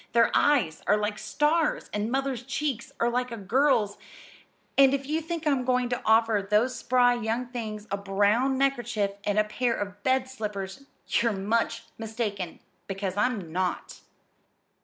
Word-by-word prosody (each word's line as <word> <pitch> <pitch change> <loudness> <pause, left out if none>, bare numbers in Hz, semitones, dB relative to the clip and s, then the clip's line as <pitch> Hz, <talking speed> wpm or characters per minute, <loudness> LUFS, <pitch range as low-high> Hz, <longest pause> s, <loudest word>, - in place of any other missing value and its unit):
Their 230 0 +4
eyes 235 - +2
are 210 - +4
like 210 0 -2
stars, 300 +8 +1
and 210 +1 -1
Mother's 270 -2 -1
cheeks 265 -1 -3
are 235 - +2
like 250 0 -1
a 230 - -5
girl's; 225 0 +2 0.8
and 275 0 +6
if 275 0 -4
you 310 +3 -1
think 330 0 -5
I'm 275 -4 +2
going 250 -1 +1
to 245 - -2
offer 220 -1 +4
those 210 +6 +1
spry 245 -1 +3
young 235 +1 -2
things 220 -4 -6
a 200 - 0
brown 205 +7 +2
neckerchief 240 -7 0
and 205 0 0
a 215 - +5
pair 235 +3 -1
of 205 0 -5
bed 260 +2 +1
slippers 210 -1 -6 0.2
you're 230 -1 +2
much 225 +3 -1 0.2
mistaken 215 -5 -4 0.3
because 195 -1 -3
I'm 205 -6 -1
not!" 185 +1 -2
230 Hz, 160 wpm, -27 LUFS, 205-260 Hz, 0.8 s, and